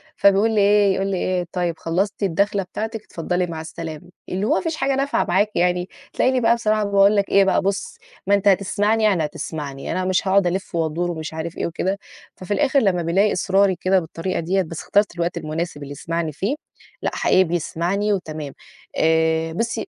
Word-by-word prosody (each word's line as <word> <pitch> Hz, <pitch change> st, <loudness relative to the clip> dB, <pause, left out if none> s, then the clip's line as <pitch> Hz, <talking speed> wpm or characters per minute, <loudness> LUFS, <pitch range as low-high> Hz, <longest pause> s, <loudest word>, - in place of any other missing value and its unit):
فبيقول 200 Hz, +3 st, +4 dB
لي 215 Hz, -2 st, +2 dB
إيه 200 Hz, -1 st, +4 dB
يقول 195 Hz, +1 st, -1 dB
لي 195 Hz, -, -1 dB
إيه، 180 Hz, 0 st, -1 dB
"طيب 175 Hz, -3 st, -2 dB
خلّصتِ 195 Hz, +5 st, -1 dB
الدخلة 200 Hz, +2 st, +1 dB
بتاعتِك؟ 220 Hz, +4 st, -5 dB
اتفضّلي 180 Hz, +2 st, -2 dB
مع 160 Hz, -2 st, -5 dB
السلامة،" 160 Hz, 0 st, -8 dB, 0.2 s
اللي 190 Hz, +3 st, -1 dB
هو -, -, +2 dB
ما -, -, +1 dB
فيش 330 Hz, -3 st, -2 dB
حاجة 275 Hz, -3 st, 0 dB
نافعة 275 Hz, +1 st, 0 dB
معاك 195 Hz, +4 st, +2 dB
يعني، 180 Hz, +1 st, +1 dB, 0.2 s
تلاقيني 255 Hz, -1 st, +2 dB
بقى 230 Hz, +1 st, +4 dB
بصراحة 215 Hz, -2 st, +1 dB
باقول 200 Hz, 0 st, +4 dB
لك 200 Hz, -1 st, +1 dB
إيه 200 Hz, -, +5 dB
بقى، 195 Hz, -, +2 dB
"بُصّ 195 Hz, 0 st, -2 dB, 0.3 s
ما 200 Hz, -, +5 dB
أنت 200 Hz, -, 0 dB
هتسمعني 205 Hz, +3 st, +2 dB
يعني 190 Hz, -7 st, +3 dB
هتسمعني، 145 Hz, -2 st, -6 dB
أنا 185 Hz, 0 st, -1 dB
مش 185 Hz, +1 st, +1 dB
هاقعد 195 Hz, -1 st, +4 dB
ألِفّ" 185 Hz, 0 st, -3 dB
وأدُور 165 Hz, +2 st, -1 dB
ومش 160 Hz, -2 st, -6 dB
عارف 160 Hz, +1 st, -5 dB
إيه -, -, -1 dB
وكده، 185 Hz, +4 st, -2 dB, 0.4 s
ففي 185 Hz, +2 st, -4 dB
الآخر 280 Hz, +4 st, +3 dB
لمّا 190 Hz, -7 st, +1 dB
بيلاقي 190 Hz, +5 st, +2 dB
إصراري 190 Hz, +1 st, +2 dB
كده 190 Hz, 0 st, +3 dB
بالطريقة 170 Hz, +2 st, -4 dB
ديّة 185 Hz, +4 st, +1 dB
بس 165 Hz, -2 st, -6 dB
اخترت 205 Hz, -3 st, +1 dB
الوقت 175 Hz, 0 st, -2 dB
المناسب 155 Hz, -1 st, -4 dB
اللي 140 Hz, -, -8 dB
يسمعني 165 Hz, +2 st, -3 dB
فيه، 200 Hz, -, -2 dB, 0.5 s
لأ -, -, -1 dB
حقيقي 185 Hz, -, +4 dB
بيسمعني 175 Hz, +4 st, -1 dB
وتمام. 155 Hz, -6 st, -5 dB, 0.4 s
آآ، 160 Hz, 0 st, +2 dB
بُصي 230 Hz, -, -2 dB
185 Hz, 195 wpm, -21 LUFS, 165-200 Hz, 0.5 s, إيه